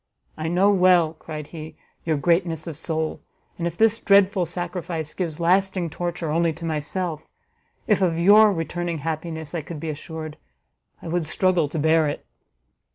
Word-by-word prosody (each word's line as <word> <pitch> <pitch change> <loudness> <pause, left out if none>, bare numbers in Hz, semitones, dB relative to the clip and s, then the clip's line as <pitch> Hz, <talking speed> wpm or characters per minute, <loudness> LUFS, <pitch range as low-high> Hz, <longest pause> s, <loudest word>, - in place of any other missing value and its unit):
"I 155 - -4
know 185 +5 +3
well," 180 -4 +4
cried 155 -1 -8
he, 155 0 -9 0.3
"your 160 -2 +1
greatness 165 0 +1
of 165 - -6
soul; 160 0 -3 0.4
and 170 - 0
if 170 0 -5
this 225 0 +3
dreadful 200 -2 +4
sacrifice 170 -2 -4
gives 170 -4 -4
lasting 185 0 +1
torture 175 -2 -3
only 165 +1 +2
to 170 +2 -8
myself, 160 +1 -3 0.6
if 210 -3 +2
of 170 -3 +2
your 210 +4 +7
returning 170 -1 -3
happiness 160 -1 -4
I 170 - -2
could 155 +1 -8
be 160 +1 -3
assured, 155 +1 -7 0.7
I - - -7
would 165 -1 -1
struggle 175 -2 +1
to 160 - -5
bear 160 +1 +3
it." 145 - -4
165 Hz, 160 wpm, -23 LUFS, 155-180 Hz, 0.7 s, your